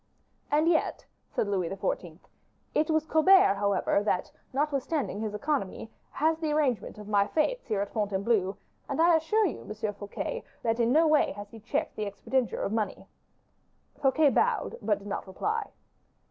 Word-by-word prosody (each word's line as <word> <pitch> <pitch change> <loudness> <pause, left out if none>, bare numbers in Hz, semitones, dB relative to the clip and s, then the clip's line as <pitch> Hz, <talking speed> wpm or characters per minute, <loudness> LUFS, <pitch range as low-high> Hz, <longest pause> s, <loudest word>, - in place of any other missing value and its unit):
"And 305 +2 +3
yet," 330 -2 +1 0.2
said - - -1
Louis 185 -4 0
XIV., 180 -4 -3 0.6
"it 310 +2 +1
was 315 -1 +2
Colbert, 320 - +6
however, 200 0 +1
that, 205 -3 -1 0.2
notwithstanding 280 - -1
his 215 -1 -3
economy, 225 -4 -2 0.2
had 320 +2 0
the 310 -2 0
arrangement 255 -10 0
of 210 -1 -9
my 205 -1 +3
fetes - - 0
here 210 -4 0
at 200 - -3
Fontainebleau; 200 -1 0 0.3
and 280 - -2
I 335 +1 +6
assure 415 +8 +2
you, 340 - -3
Monsieur 215 0 -4
Fouquet, 205 - -5 0.2
that 225 0 0
in 235 0 +3
no 315 +4 +5
way 305 -1 +3
has 205 +1 -9
he 225 - -11
checked 225 +3 -2
the 215 - -1
expenditure 225 +3 -1
of - - -1
money." 220 -2 -2 1.0
Fouquet 280 +2 +4
bowed, 465 - +1
but 210 -2 +1
did 200 0 -12
not 200 - -4
reply. 425 - -2
235 Hz, 165 wpm, -28 LUFS, 205-310 Hz, 1.0 s, Colbert